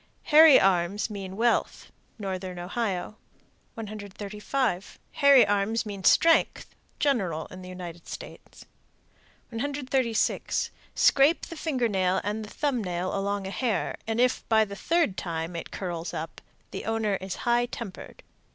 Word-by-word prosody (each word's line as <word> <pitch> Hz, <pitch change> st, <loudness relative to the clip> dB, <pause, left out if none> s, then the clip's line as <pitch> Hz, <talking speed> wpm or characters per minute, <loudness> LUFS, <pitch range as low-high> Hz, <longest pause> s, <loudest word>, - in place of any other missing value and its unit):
Hairy 310 Hz, -2 st, +8 dB
arms 195 Hz, +3 st, +1 dB
mean 195 Hz, -2 st, -6 dB
wealth. 235 Hz, +1 st, 0 dB, 0.3 s
Northern 190 Hz, -3 st, -5 dB
Ohio. 195 Hz, +1 st, -3 dB, 0.6 s
135. 210 Hz, 0 st, -4 dB
Hairy 280 Hz, -3 st, +6 dB
arms 205 Hz, +3 st, 0 dB
mean 200 Hz, -2 st, -6 dB
strength. 330 Hz, -, +3 dB, 0.2 s
General 190 Hz, -, 0 dB
in 185 Hz, -, -9 dB
the 185 Hz, -, -9 dB
United 175 Hz, -2 st, -9 dB
States. -, -, -10 dB, 0.8 s
136. 260 Hz, -1 st, -1 dB, 0.2 s
Scrape 325 Hz, -, +4 dB
the 335 Hz, -, -9 dB
finger 275 Hz, -7 st, 0 dB
nail 190 Hz, -3 st, +1 dB
and 210 Hz, +2 st, -3 dB
the 210 Hz, -, -9 dB
thumb 270 Hz, -5 st, -1 dB
nail 180 Hz, 0 st, -2 dB
along 200 Hz, 0 st, -2 dB
a 190 Hz, -, -5 dB
hair, 225 Hz, -5 st, -1 dB
and 225 Hz, +1 st, -1 dB
if, 250 Hz, +1 st, +2 dB
by 220 Hz, -1 st, +5 dB
the 200 Hz, -1 st, -8 dB
third 325 Hz, -, +1 dB
time, 165 Hz, 0 st, -4 dB
it 170 Hz, -, -6 dB
curls 175 Hz, -3 st, -5 dB
up, 160 Hz, +1 st, -6 dB, 0.3 s
the -, -, -6 dB
owner 225 Hz, -2 st, 0 dB
is 190 Hz, 0 st, -6 dB
high 240 Hz, 0 st, +3 dB
tempered. 230 Hz, -5 st, -9 dB
210 Hz, 135 wpm, -27 LUFS, 185-240 Hz, 0.8 s, Hairy